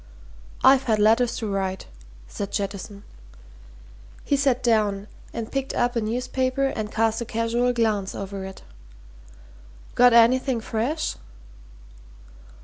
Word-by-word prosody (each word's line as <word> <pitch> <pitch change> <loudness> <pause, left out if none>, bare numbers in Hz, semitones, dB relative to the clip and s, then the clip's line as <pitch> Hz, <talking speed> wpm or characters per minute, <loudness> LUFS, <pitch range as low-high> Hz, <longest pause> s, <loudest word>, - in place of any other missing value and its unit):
"I've 270 0 +6
had 220 -3 +2
letters 225 +3 +3
to 225 - -4
write," 190 -2 -2 0.4
said 200 - -6
Jettison. 200 0 -5 1.2
He 285 - +1
sat 270 -3 +1
down 210 -4 +1 0.3
and 225 -1 -6
picked 270 0 -3
up 245 +1 0
a 230 - +1
newspaper 255 +4 -1
and 215 -5 -3
cast 225 +1 0
a - - 0
casual 230 +2 0
glance 215 -5 0
over 195 0 -6
it. 190 0 -9 1.3
"Got 245 0 +5
anything 245 +2 +4
fresh?" 235 +8 -2
230 Hz, 120 wpm, -24 LUFS, 205-250 Hz, 1.3 s, I've